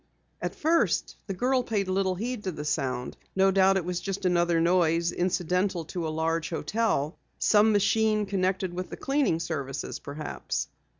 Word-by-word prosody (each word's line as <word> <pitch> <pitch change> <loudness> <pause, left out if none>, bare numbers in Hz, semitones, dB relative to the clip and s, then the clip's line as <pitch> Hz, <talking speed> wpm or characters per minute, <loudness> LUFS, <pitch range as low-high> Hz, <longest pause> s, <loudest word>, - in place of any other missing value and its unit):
At - - -3
first 330 +2 +1
the 195 - -3
girl 255 +5 +2
paid 210 -5 -1
little 190 0 +1
heed 230 +2 -4
to 185 - 0
the 150 -2 -6
sound. 130 -4 -2 0.2
No 195 0 +4
doubt 190 0 +4
it 180 - -2
was 180 -1 -2
just 195 +1 -4
another 175 -2 +3
noise 170 -1 +3
incidental 180 0 0
to 170 -3 -2
a - - -2
large 160 +1 -1
hotel 180 -4 -1 0.2
some 215 +1 +4
machine 215 +1 +2
connected 190 -2 -1
with 185 +1 -4
the - - -7
cleaning 270 - +1
services 140 -5 -4
perhaps. 145 +1 -4
185 Hz, 165 wpm, -27 LUFS, 165-205 Hz, 0.2 s, No